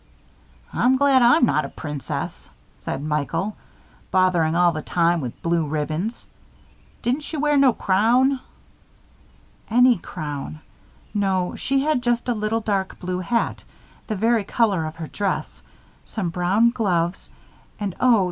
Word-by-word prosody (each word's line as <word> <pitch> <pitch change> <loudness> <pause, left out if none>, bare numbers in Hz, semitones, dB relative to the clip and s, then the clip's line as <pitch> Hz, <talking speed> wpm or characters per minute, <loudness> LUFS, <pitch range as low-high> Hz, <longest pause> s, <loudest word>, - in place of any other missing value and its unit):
"I'm 260 +1 +3
glad 275 -1 +4
I'm 240 +1 +6
not 155 -9 +1
a 140 - -5
princess," 145 -3 -6 0.3
said 140 - -4
Michael. 155 +6 -2 0.6
"Botherin' 180 -4 +3
all 175 0 +4
the 155 -1 -4
time 170 +1 +1
with 125 -3 -6
blue 170 0 +1
ribbons. 155 +9 -3 0.8
Didn't 255 +5 0
she 310 +1 -6
wear 295 0 +2
no 275 -2 +6
crown?" 240 +7 +2 1.3
"Any 245 -1 +5
crown. 150 -1 -6 0.5
No, 190 -3 0
she 270 0 0
had 300 -4 +1
just 240 0 0
a 245 - +2
little 215 +1 -1
dark 195 -3 -2
blue 180 0 -3
hat 230 +6 -1 0.4
the 215 - -2
very 225 +2 +2
color 200 -5 +1
of 155 - -7
her 165 -1 -6
dress, 195 +4 -3 0.4
some 195 -6 -3
brown 195 +6 +3
gloves 180 -7 -1 0.5
and 200 -3 -2
oh! 245 -4 +5
195 Hz, 140 wpm, -23 LUFS, 170-240 Hz, 1.3 s, I'm